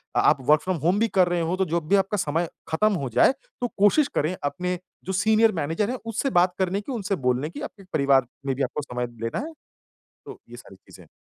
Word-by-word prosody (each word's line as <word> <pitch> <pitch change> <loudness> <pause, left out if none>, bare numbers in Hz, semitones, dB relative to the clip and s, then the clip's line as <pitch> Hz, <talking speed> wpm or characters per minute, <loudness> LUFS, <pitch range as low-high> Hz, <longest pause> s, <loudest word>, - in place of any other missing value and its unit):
अ - - +3
आप - - +4
work 150 0 +6
from 185 -2 -2
home 185 +5 +3
भी 230 - +3
कर 185 -2 +5
रहे 175 -1 0
हों 170 +3 -1
तो 190 - +1
जब 165 -1 -2
भी 200 - +5
आपका 195 +1 +1
समय 165 0 -1 0.2
खत्म 210 +6 +2
हो 130 - -2
जाए - - +5 0.3
तो 245 - +1
कोशिश 205 +9 +4
करें 160 +5 0
अपने 180 +4 -2 0.3
जो 190 - -3
सीनियर 220 +3 +4
मैनेजर 165 +9 -1
है 255 - -3
उससे 230 +5 -1
बात 180 0 +3
करने 190 +2 0
की 265 - -7
उनसे 200 -3 -2
बोलने 130 +5 +1
की 290 - -9
आपके 205 -9 -8
परिवार 140 -4 +3 0.2
में 135 -1 0
भी 135 - -1
आपको 150 - -2
समय 125 -3 -4 0.2
लेना 115 - -2
है। 330 - -10 0.7
तो - - -10
ये - - -10
सारी - - -13
चीज़ें - - -17
हैं। - - -26
180 Hz, 240 wpm, -24 LUFS, 155-205 Hz, 0.7 s, work